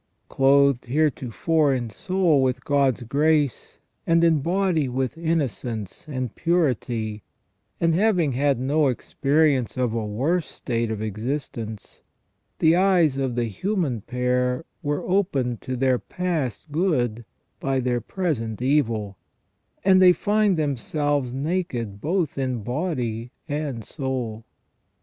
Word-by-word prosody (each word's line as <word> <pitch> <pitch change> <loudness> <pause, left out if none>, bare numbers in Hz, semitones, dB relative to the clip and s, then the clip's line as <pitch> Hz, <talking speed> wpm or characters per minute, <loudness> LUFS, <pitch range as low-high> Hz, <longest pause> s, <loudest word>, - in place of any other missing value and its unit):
Clothed 140 -1 +4
heretofore 145 +2 +1
in 120 -3 -3
soul 180 - +2
with 130 0 0
God's 135 -4 +2
grace, 145 +1 +1 0.3
and 165 0 +4
in 165 -2 +4
body 175 -3 +1
with 130 0 -2
innocence 130 - -3
and 130 -5 -4
purity, 120 -10 0 0.6
and 165 -1 +2
having 180 -5 +2
had 140 0 +1
no 145 +3 +2
experience 135 0 +1
of 125 -3 0
a 115 -1 -1
worse 140 +12 0
state 115 -2 -2
of 110 -1 -3
existence, 110 0 -5 0.6
the 160 +1 +4
eyes 175 -7 +3
of 130 -3 -1
the 120 - +1
human 140 - -2
pair 125 +4 -1 0.2
were 145 -2 -2
opened 145 - 0
to 130 - -4
their 130 -1 +2
past 160 - -3
good 130 - 0 0.4
by 135 -1 0
their 120 -1 0
present 120 - -2
evil, 115 -7 0 0.7
and 190 -1 +6
they 180 -1 +8
find 205 -1 +2
them 145 -4 0
selves 145 -1 -1
naked 130 - -3
both 165 - -1
in 130 -4 -2
body 125 - -2 0.2
and 145 -6 -3
soul. 125 -6 -4
135 Hz, 125 wpm, -24 LUFS, 120-160 Hz, 0.7 s, they